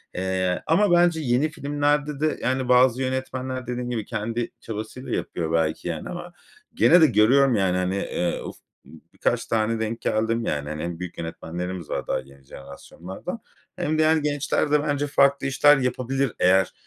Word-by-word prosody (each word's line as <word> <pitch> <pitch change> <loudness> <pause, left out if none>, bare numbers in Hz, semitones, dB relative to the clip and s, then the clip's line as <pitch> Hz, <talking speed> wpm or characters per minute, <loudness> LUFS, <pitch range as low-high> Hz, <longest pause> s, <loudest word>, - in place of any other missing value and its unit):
eee, 95 0 -1
ama 195 +4 +3
bence 175 -2 +4
yeni 130 +3 +1
filmlerde 145 -1 -1
de, 155 0 0
yani, 130 0 -1
bazı 125 0 +4
yönetmenler 130 -1 -3
dediğim 125 0 -3
gibi, 115 -4 -3
kendi 115 +1 -3
çabasıyla 115 +4 -7
yapıyor 80 -2 -3
belki, 80 +1 0
yani, 80 -2 -4
ama 175 0 -7 0.4
gene 175 - +5
de - - +8
görüyorum, 125 +4 +4
yani, 95 -3 +1
hani, 90 +1 -1
eee, 90 -2 -2
uf, - - -7 0.3
birkaç 80 - -3
tane 115 0 0
denk 110 +1 -3
geldim, 115 +2 0
yani. 75 0 -2
Hani, 75 0 -5
hem 85 0 -5
büyük 90 -1 -7
yönetmenlerimiz 85 +1 -6
var - - -3
daha - - 0
yeni 70 +1 -15
jenerasyonlardan 85 - -9 0.4
hem 155 -3 -1
diğer 155 0 +4
gençler 145 0 -1
de 150 -1 +3
bence 145 -1 -1
farklı 140 -1 +3
işler 145 +2 +5
yapabilir 130 0 -1
eğer 95 +1 +3
125 Hz, 165 wpm, -24 LUFS, 95-145 Hz, 0.4 s, de